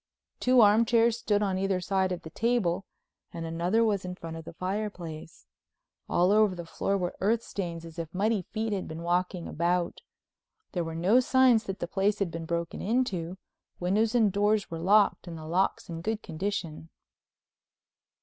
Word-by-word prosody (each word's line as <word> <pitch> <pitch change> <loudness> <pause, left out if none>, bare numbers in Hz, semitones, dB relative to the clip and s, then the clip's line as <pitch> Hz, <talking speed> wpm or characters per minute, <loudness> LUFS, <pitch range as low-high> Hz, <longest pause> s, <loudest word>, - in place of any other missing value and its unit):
Two 250 -1 +5
armchairs 230 +2 +4
stood 210 -2 +1
on 190 -2 0
either 195 -1 0
side 190 +1 0
of 180 - -4
the 160 - -9
table 200 -5 0 0.5
and 165 -1 -5
another 175 +7 +1
was 205 -4 +1
in 180 0 -5
front 165 -2 -7
of 165 0 -8
the - - -9
fireplace. 185 -4 -5 0.6
All 180 +2 +3
over 210 -2 +4
the 170 -1 -7
floor 195 +4 -1
were 180 -2 -3
earth 220 +4 +1
stains 170 -4 -5
as 165 0 -10
if 165 -1 -5
muddy 205 +3 +1
feet 220 +4 -3
had 195 - -3
been 160 +1 -7
walking 180 0 -1
about. 175 +2 -1 0.7
There 175 - -1
were 165 0 -5
no 190 +9 +4
signs 255 -3 +4
that 195 -1 -4
the - - -3
place 200 +3 +1
had 200 -4 -1
been 165 0 -5
broken 170 +1 -3
into—windows 195 0 -2
and 220 -4 +4
doors 205 0 +1
were 165 - -4
locked 200 +2 +3
and 170 -1 -6
the 155 - -9
locks 180 +5 0
in 165 -1 -6
good 220 +4 -2
condition. 165 -2 -4
190 Hz, 175 wpm, -28 LUFS, 170-215 Hz, 0.7 s, Two